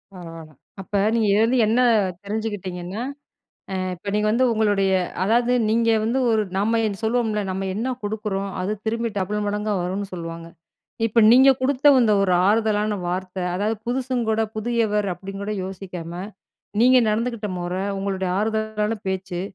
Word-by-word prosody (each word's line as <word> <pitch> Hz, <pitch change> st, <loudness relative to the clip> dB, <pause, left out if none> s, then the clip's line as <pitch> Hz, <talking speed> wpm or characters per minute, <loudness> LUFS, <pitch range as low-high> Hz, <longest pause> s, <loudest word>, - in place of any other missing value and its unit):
பரவால. 165 Hz, -3 st, -10 dB, 0.3 s
அப்ப 200 Hz, +1 st, -2 dB, 0.2 s
நீங்க 220 Hz, -2 st, +2 dB
இதுலருந்து 225 Hz, +5 st, +3 dB
என்ன 235 Hz, +3 st, +3 dB, 0.4 s
தெரிஞ்சுக்கிட்டிங்கன்னா, 200 Hz, -2 st, -4 dB, 0.7 s
அ -, -, -2 dB, 0.2 s
இப்ப 200 Hz, +3 st, -6 dB
நீங்க 210 Hz, 0 st, +1 dB
வந்து 250 Hz, +4 st, +3 dB
உங்களுடைய 205 Hz, -3 st, +2 dB, 0.3 s
அதாவது 235 Hz, +4 st, +2 dB, 0.2 s
நீங்க 230 Hz, +1 st, +2 dB, 0.2 s
வந்து 240 Hz, +4 st, 0 dB
ஒரு 220 Hz, -1 st, +2 dB, 0.2 s
நம்ம 225 Hz, +3 st, +2 dB
என் 200 Hz, -2 st, -3 dB
சொல்லுவோம்ல 220 Hz, -2 st, 0 dB
நம்ம 190 Hz, +1 st, -3 dB
என்ன 250 Hz, +5 st, -1 dB
குடுக்குறோம் 205 Hz, -2 st, -3 dB
அது 195 Hz, +3 st, -1 dB
திரும்பி 230 Hz, +1 st, 0 dB
டபுள் 205 Hz, +2 st, -2 dB
மடங்கா 210 Hz, +1 st, -1 dB
வரும்னு 190 Hz, +3 st, -3 dB
சொல்லுவாங்க. 165 Hz, -1 st, -6 dB, 0.6 s
இப்ப 230 Hz, +1 st, +3 dB
நீங்க 265 Hz, +3 st, +7 dB
குடுத்த 275 Hz, +2 st, +4 dB
இந்த 215 Hz, -2 st, +3 dB
ஒரு 185 Hz, -2 st, +2 dB
ஆறுதலான 210 Hz, -1 st, +2 dB
வார்த்த 185 Hz, +1 st, -4 dB, 0.2 s
அதாவது 210 Hz, +4 st, -1 dB
புதுசுங்க 250 Hz, -1 st, -1 dB
கூட 220 Hz, 0 st, +1 dB
புதியவர் 215 Hz, -3 st, 0 dB
அப்டின்னு 195 Hz, +2 st, -8 dB
கூட 210 Hz, +1 st, -3 dB
யோசிக்காம. 180 Hz, -3 st, -7 dB, 0.7 s
நீங்க 255 Hz, +1 st, +6 dB
நடந்துக்கிட்ட 225 Hz, -1 st, -1 dB
மொற, 175 Hz, +1 st, -3 dB, 0.2 s
உங்களுடைய 190 Hz, -1 st, -2 dB
ஆறுதலான 220 Hz, 0 st, -1 dB
பேச்சு, 190 Hz, -2 st, -3 dB
210 Hz, 145 wpm, -23 LUFS, 190-225 Hz, 0.7 s, நீங்க